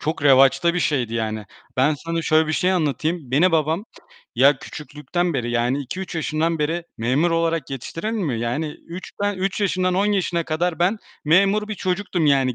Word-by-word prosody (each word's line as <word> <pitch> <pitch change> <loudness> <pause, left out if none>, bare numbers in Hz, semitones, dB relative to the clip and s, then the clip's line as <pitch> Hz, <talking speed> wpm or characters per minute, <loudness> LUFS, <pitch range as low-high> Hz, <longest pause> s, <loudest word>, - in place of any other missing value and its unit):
çok 155 -1 -3
revaçta 135 +4 +5
bir - - +1
şeydi, 125 -8 0
yani. 110 -1 -2 0.3
Ben 135 +4 +3
sana 165 +3 -3
şöyle 155 0 +3
bir 155 - -1
şey 180 +4 +2
anlatayım. 155 -3 -1
Beni 165 +6 +3
babam, 160 +5 +1 0.5
ya, 135 +3 +5
küçüklükten 150 +4 -4
beri 120 -2 -1
yani, 120 +3 +1
2-3 180 +8 -6
yaşından 160 +1 -1
beri 165 +3 -1
memur 130 +9 +1
olarak 165 -2 0
yetiştirir 165 - -4
mi? 165 - -1
Yani, 120 +7 -1 0.2
3, 175 +2 -8
ben, 205 0 +1
3 195 +2 -1
yaşından 185 -2 +1
10 195 +3 +2
yaşına 180 -5 0
kadar 165 +2 -1
ben 185 +6 +2 0.3
memur 195 +6 +3
bir 215 - -3
çocuktum. 185 -3 -1
Yani, 135 -3 +3
160 Hz, 175 wpm, -22 LUFS, 135-180 Hz, 0.5 s, revaçta